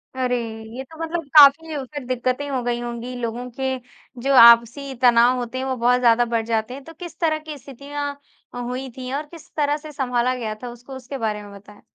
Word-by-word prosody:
अरे, 250 -1 0 0.4
ये 260 - -5
तो 320 +4 -15
मतलब 330 0 -3
काफ़ी 300 +2 +7
उसे 285 0 -6
दिक्कतें 255 +3 -2
हो 260 -2 -1
गई 240 0 -1
होंगी। 240 +1 -6
लोगों 245 +1 -4
के 265 0 0 0.5
जो 275 +2 +1
आपसी 235 +4 +5
तनाव 245 0 +5
होते 245 +1 -4
हैं 260 - -3
वो 260 -1 -1
बहुत 245 +1 +2
ज़्यादा 240 0 +4
बढ़ 230 -1 -1
जाते 225 +1 -1
हैं, 275 - -9
तो 325 +4 -12
किस 345 +1 -10
तरह 315 -2 +1
की 305 -1 -7
स्थितियाँ 285 +2 -6 0.4
हुई 250 +2 -4
थी 255 0 -6
और 295 +2 -2
किस 335 -3 -13
तरह 295 -1 +1
से 305 0 -11
संभाला 255 -2 0
गया 220 -3 -4
था 245 - -5
उसको 245 +3 -11
उसके 260 +1 -7
बारे 210 -3 -3
में 205 - -12
बताएँ? 205 +1 -15
255 Hz, 210 wpm, -22 LUFS, 240-280 Hz, 0.5 s, काफ़ी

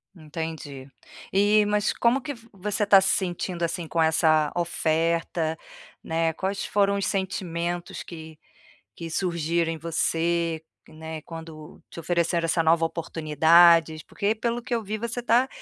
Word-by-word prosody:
Entendi. 155 -4 -7 0.4
E, 205 +2 +4
mas 210 0 +1
como 245 +3 +1
que 285 0 -5
vo 230 -1 -18
você 205 +2 -2
tá 200 -1 +7
se 190 - +1
sentindo, 175 -1 -2
assim, 170 0 -2
com 165 +1 0
essa 155 -1 +3
oferta, 165 -1 0 0.5
né, 165 0 0
quais 195 +4 -3
foram 200 -1 +2
os 200 - -1
sentimentos 175 -3 -3
que 160 -2 -10 0.6
que 165 -1 -8
surgiram 170 -1 0
em 165 - -5
você, 165 0 0 0.3
né, 160 0 -8
quando 160 -2 -10
te - - -10
ofereceram 170 0 0
essa 165 0 +1
nova 165 +1 +3
oportunidades? 165 0 +4
Porque, 205 +7 -1
pelo 235 +2 -2
que 240 +1 -5
eu 230 - 0
vi, 215 +2 -4
você 235 +2 -4
tá 245 +2 +3
170 Hz, 145 wpm, -25 LUFS, 160-195 Hz, 0.6 s, tá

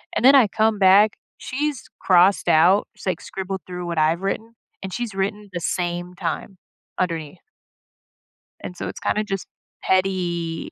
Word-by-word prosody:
And - - 0
then 265 +2 +8
I 255 -5 +6
come 215 +1 +1
back. 200 +2 +5 0.2
She's 285 -2 -3 0.2
crossed 185 +1 +4
out. 180 +6 +4
She's, - - -13
like, 185 -4 -1
scribbled 190 0 -5
through 180 -1 -6
what 170 -1 -4
I've 160 +3 +2
written, 220 +4 -4 0.3
and 190 -1 -6
she's 240 -4 -4
written 200 +2 -3
the 175 - -3
same 175 +1 -3
time 180 +2 -4 0.4
underneath. 165 -3 -3 1.2
And 180 - -7
so - - -5
it's - - -7
kinda 215 - 0
just 195 -3 -4 0.4
petty 175 -3 -1
190 Hz, 155 wpm, -22 LUFS, 175-210 Hz, 1.2 s, then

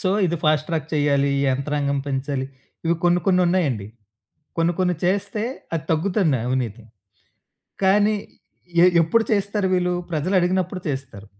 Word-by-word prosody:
So, 185 - 0 0.2
ఇది 170 0 -1
fast 155 0 +2
track 160 -1 -2
చేయాలి, 140 -1 +2
ఈ - - +1
యంత్రాంగం 140 +1 -1
పెంచాలి. 135 -1 -2 0.4
ఇవి 170 - +3
కొన్ని, 175 0 +4
కొన్ని 185 -1 +4
ఉన్నాయండి. 145 - 0 0.7
కొన్ని, 165 +1 +2
కొన్ని 180 -1 +2
చేస్తే, 200 +3 0 0.3
అది 160 -2 -1
తగ్గుతుంది 160 - +1
అవినీతి. 120 -3 -2 1.0
కానీ 205 +2 +4 0.7
ఎ - - +8 0.2
ఎప్పుడు 225 +8 +2
చేస్తారు 200 -1 0
వీళ్ళు? 180 0 +1 0.2
ప్రజలు 165 +6 -1
అడిగినప్పుడు 185 +1 0
చేస్తారు. 130 -7 -5
165 Hz, 135 wpm, -22 LUFS, 140-185 Hz, 1.0 s, ఎ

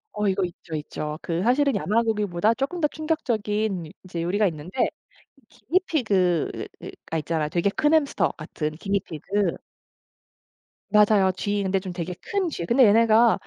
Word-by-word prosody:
어 210 0 0
이거 195 0 +1
있죠, 170 -2 -8
있죠. 150 0 -4
그 170 0 -2
사실은 265 +3 +3
야마 215 +3 +1
고기보다 210 -2 +1
쪼끔 280 +8 -3
더 300 - +4
충격적인 215 - -2
이제 175 -3 -5
요리가 200 +4 +2
있는데 170 - -2 0.6
기니피그가 200 - -1
있잖아요. 155 -1 -1
되게 175 +4 +1
큰 295 +6 +2
햄스터 310 -3 +2
같은 155 -1 -4
기니피그. 195 0 -1 1.4
맞아요 210 -2 +5
쥐. 205 +1 -1
근데 190 0 +1
좀 190 -1 -6
되게 175 0 -4
큰 390 -4 -1
쥐. 170 - -4
근데 240 +6 +5
얘네가 225 +2 +5
205 Hz, 310 characters per minute, -24 LUFS, 175-230 Hz, 1.4 s, 맞아요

